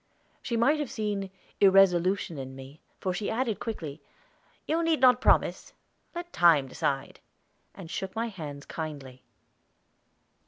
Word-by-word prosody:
She 235 - -2
might 280 +7 +3
have 295 -4 -2
seen 205 -3 -3 0.3
irresolution 190 -4 +4
in 130 0 -7
me, 135 +3 -12 0.2
for 185 - -1
she 200 +3 -3
added 230 -2 -1
quickly, 160 -10 -6 0.6
"You 325 +2 0
need 330 -3 +2
not 250 -1 +5
promise - - +2 0.4
let 345 0 -6
time 160 -6 +5
decide," 135 +1 -3 0.6
and 185 - -9
shook 190 +4 -5
my 230 +1 -1
hands 150 -8 -8
kindly. 140 -5 -7
190 Hz, 130 wpm, -28 LUFS, 150-230 Hz, 0.6 s, not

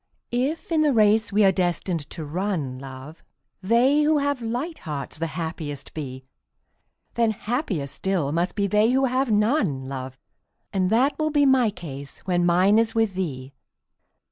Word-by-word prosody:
If 270 +9 -2
in 320 -2 +3
the 300 -2 +3
race 215 +1 +4
we 210 +1 +3
are 195 - +6
destined 175 -3 -1
to 160 - -6
run, 155 -5 -3
love, 135 +4 -10 0.4
They 240 +9 +3
who 305 +1 +3
have 285 -2 0
light 245 +9 -3
hearts 150 -1 -6
the 165 - -1
happiest 160 -4 -5
be, 130 -4 -6 0.9
Then 230 -1 +2
happier 215 - -2
still 165 0 -2
must 170 +4 -1
be 200 - +1
they 210 +4 +3
who 265 +1 +3
have 260 0 0
none, 210 - +1
love. 130 -1 -6 0.6
And 185 -2 +1
that 255 +8 +2
will 310 0 +1
be 290 -1 +3
my 260 -4 +4
case 140 -8 -9
when 175 -1 +1
mine 185 +5 +4
is 225 0 0
with 225 -3 +2
thee. 140 -8 -4
195 Hz, 165 wpm, -24 LUFS, 155-245 Hz, 0.9 s, are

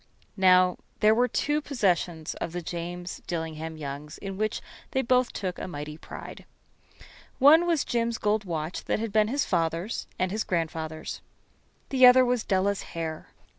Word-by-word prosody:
Now, 185 -1 +5 0.2
there 215 0 +5
were 245 +2 +3
two 295 +4 0
possessions 180 - 0
of 170 - -3
the 175 - -3
James 175 +1 -5
Dillingham 160 -1 -4
Youngs 145 0 -7
in 195 -1 -6
which 215 +2 -1 0.3
they 265 - +1
both 250 0 +2
took 185 -2 -4
a - - -4
mighty 150 -3 -6
pride. - - -10 0.9
One 315 +6 +7
was 330 -4 +1
Jim's 235 -1 0
gold 210 0 +1
watch 165 -2 -4
that - - 0
had 220 -1 -4
been 215 -1 +4
his 275 +5 0
father's 170 +4 -1
and 185 0 0
his 215 +2 -1
grandfather's. 160 -2 -3 0.7
The 260 -2 +7
other 255 +1 +7
was 245 -2 +1
Della's 195 +1 +1 0.2
hair. 160 -1 -4
185 Hz, 160 wpm, -27 LUFS, 165-235 Hz, 0.9 s, One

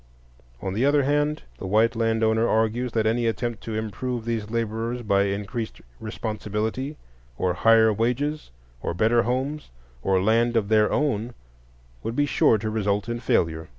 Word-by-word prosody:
On 95 - -2
the 110 +6 0
other 145 +1 +4
hand, 145 +2 0 0.2
the 95 - -5
white 110 +4 +3
land 115 0 +1
owner 110 +1 +3
argues 115 +3 +1
that 110 -1 +1
any 115 +2 +1
attempt 115 -1 -2
to 110 - -4
improve 110 +3 -3
these 115 -2 -2
laborers 115 +1 -2
by 100 -2 +2
increased 105 +3 -4 0.2
responsibility, 110 +5 -3 0.4
or 90 -1 +1
higher 110 +5 +5
wages, 130 +8 -1 0.3
or - - -3
better 115 +5 +3
homes, 130 +5 -2 0.3
or 95 +6 +2
land 115 +4 +2
of 105 -2 0
their 110 -1 +4
own, 120 -5 0 0.7
would 115 - -4
be 145 - +2
sure 115 -4 +3
to 110 +1 -3
result 105 -1 0
in 120 0 -3
failure. 80 -8 0
115 Hz, 160 wpm, -25 LUFS, 105-120 Hz, 0.7 s, higher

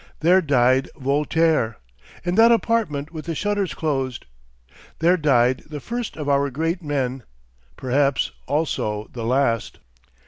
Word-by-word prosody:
There 180 +4 +5
died 130 -3 +2
Voltaire 145 -2 +1 0.5
in 175 - -1
that 225 +4 +6
apartment 205 -10 0
with 155 -2 -7
the 165 -1 -3
shutters 205 -4 -1
closed. 135 -5 -2 0.7
There 170 +3 +3
died 130 -6 +2
the 150 -1 -6
first 235 - -5
of 150 -2 -5
our 140 0 +2
great 165 +6 -2
men; 135 -4 -2 0.6
perhaps 135 +1 +1 0.2
also 110 -8 -2
the 120 - -5
last." 120 -2 0
145 Hz, 130 wpm, -22 LUFS, 130-165 Hz, 0.7 s, that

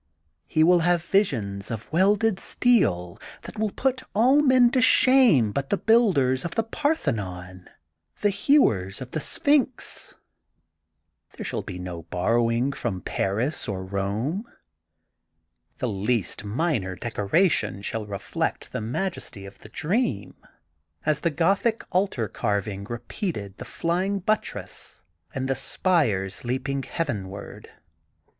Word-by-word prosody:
He 155 - +3
will 175 +2 +6
have 175 0 +2
visions 105 - 0
of 115 +5 -6
welded 200 +3 +3
steel 95 - +1 0.2
that 215 - -9
will 215 -1 +1
put 255 +4 -1
all 255 +7 +5
men 260 -4 +5
to 255 - +2
shame 250 - +5
but 135 +4 -3
the 200 - +2
builders 175 - +3
of 170 - -4
the 225 - +2
Parthenon, 100 - -3 0.5
the 205 - +3
hewers 110 - +2
of 130 -1 -8
the 155 - -2
Sphinx. 265 - 0 1.2
There - - -5
shall - - -2
be 90 - -7
no 90 -2 -6
borrowings 115 +9 0
from 100 -7 -2
Paris 115 +10 -1
or 95 -3 -4
Rome. 105 - -2 1.3
"The - - -2
least 105 0 -1
minor 105 - -1
decoration 110 - 0
shall 110 0 -4
reflect 100 -2 -3
the - - -3
majesty 120 - -4
of 100 - -12
the 110 - -13
dream, 155 - -1 0.7
as 150 -1 +1
the 170 - +2
Gothic 195 +9 +1
altar 180 - 0
carving 100 -2 -2
repeated 120 - -5
the - - -6
flying 185 +4 -1
buttress 215 +3 -3 0.3
and 130 0 -2
the 135 - +2
spires 130 - 0
leaping 130 +3 -2
heavenward. 100 - -5
135 Hz, 125 wpm, -25 LUFS, -, 1.3 s, will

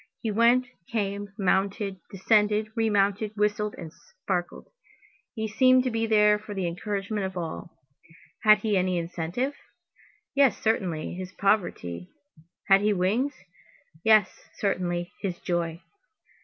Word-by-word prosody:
He 225 - -2
went, 235 +4 +4 0.3
came, 205 -2 -2
mounted, 195 0 0
descended, 210 +2 +2
re 225 -1 +1
mounted, 205 +1 +1
whistled, 210 0 0
and 165 -3 -9
sparkled. 485 0 -5 0.7
He 220 -1 -2
seemed 255 +4 +4
to 255 - -1
be 225 0 -1
there 210 -1 +4
for 210 -1 -8
the 190 -2 -2
encouragement 200 +3 -3
of 190 -1 -9
all. 170 -1 -6 0.6
Had 215 0 +7
he 215 -2 0
any 185 -1 +1
incentive? 170 - -3 0.8
Yes, 275 -4 +4
certainly, 185 -8 -1
his 185 +1 -7
poverty; 130 - -1 0.6
had 195 -1 +6
he 210 0 +2
wings? 210 +10 0 0.7
yes, 215 -3 +3
certainly, 175 -3 -1
his 185 -3 -3
joy. 170 -1 -2
205 Hz, 130 wpm, -26 LUFS, 185-220 Hz, 0.8 s, Had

